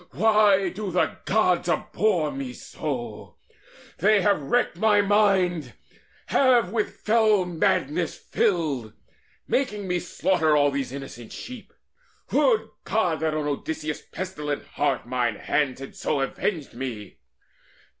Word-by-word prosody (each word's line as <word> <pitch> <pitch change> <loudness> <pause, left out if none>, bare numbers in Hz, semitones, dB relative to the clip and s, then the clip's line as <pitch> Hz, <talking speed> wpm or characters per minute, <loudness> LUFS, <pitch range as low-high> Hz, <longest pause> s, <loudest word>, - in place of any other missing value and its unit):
why 210 -2 +4
do 200 +2 -5
the 180 0 +1
Gods 180 -4 +2
abhor 170 -1 +1
me 135 -2 -5
so? 120 - -6 0.6
They 205 +2 +4
have 200 -5 +3
wrecked 240 - 0
my 215 -2 +4
mind, 190 - +2 0.5
have 245 -8 +3
with 220 -2 -2
fell 215 -3 +3
madness 165 -1 0
filled, 145 - -1 0.5
Making 210 -7 -1
me 180 -1 0
slaughter 160 -3 +1
all 145 -1 +4
these 140 -2 -3
innocent 135 -4 -8
sheep! 250 -3 -9 0.6
Would 465 -3 +3 0.2
God 180 -8 0
that 160 -1 0
on 155 -1 -1
Odysseus' 150 +1 -3
pestilent 150 -6 -4
heart - - -1
Mine 120 -2 0
hands 135 +3 -1
had 135 - -9
so 145 -3 -1
avenged 150 +3 -2
me! 120 -4 -6
170 Hz, 125 wpm, -25 LUFS, 140-205 Hz, 0.6 s, why